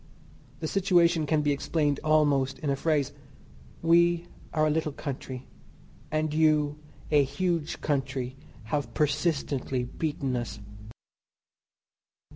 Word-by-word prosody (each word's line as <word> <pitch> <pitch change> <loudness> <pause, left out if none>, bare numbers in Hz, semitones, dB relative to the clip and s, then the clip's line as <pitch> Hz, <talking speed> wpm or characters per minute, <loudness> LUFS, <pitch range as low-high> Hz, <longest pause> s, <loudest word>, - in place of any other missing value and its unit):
The 160 - -1
situation 175 -4 +3
can 150 0 +2
be 145 - +2
explained 145 0 0
almost 145 -3 +3
in 140 +1 -1
a - - +2
phrase. 150 -1 0 0.7
We 170 +1 +4 0.3
are 155 -1 +2
a - - +3
little 155 0 0
country 130 -2 -6 0.6
and 155 0 0
you, 150 -1 +3 0.3
a 145 -2 +6
huge 165 +3 -2
country, 135 -3 -1 0.3
have 115 +2 -3
persistently 145 -4 0
beaten 135 0 -2
us. 120 -3 -4
150 Hz, 110 wpm, -28 LUFS, 135-160 Hz, 0.7 s, a